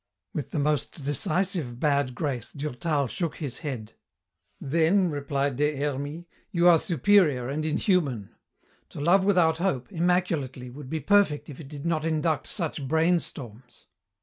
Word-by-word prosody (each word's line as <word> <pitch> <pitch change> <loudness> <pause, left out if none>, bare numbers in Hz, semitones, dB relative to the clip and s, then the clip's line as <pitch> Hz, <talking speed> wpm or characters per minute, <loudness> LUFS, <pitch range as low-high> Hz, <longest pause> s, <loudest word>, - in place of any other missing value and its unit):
With 145 - -4
the - - -4
most 150 +1 -1
decisive 155 - -1
bad 140 -3 +1
grace 130 -7 -3
Durtal 145 +1 -1
shook 165 - -3
his 135 -5 -4
head. 130 -9 -5 0.7
"Then," 165 +5 +2
replied 140 -2 -1
Des 150 +1 +1
Hermies, 145 +3 -3 0.2
"you 175 0 +3
are 170 -2 +7
superior 165 -8 +3
and 150 +3 -2
inhuman. 150 - 0 0.6
To - - -9
love 175 +6 +4
without 175 -5 +3
hope, 175 -5 -1
immaculately, 165 -8 0
would 135 0 -10
be 160 +1 -2
perfect 195 -3 +3
if 135 - -11
it 150 - -9
did 145 +1 -8
not 165 -2 0
induct 160 -1 0
such 155 -6 -3
brainstorms. 140 -7 -1
150 Hz, 145 wpm, -26 LUFS, 135-170 Hz, 0.7 s, are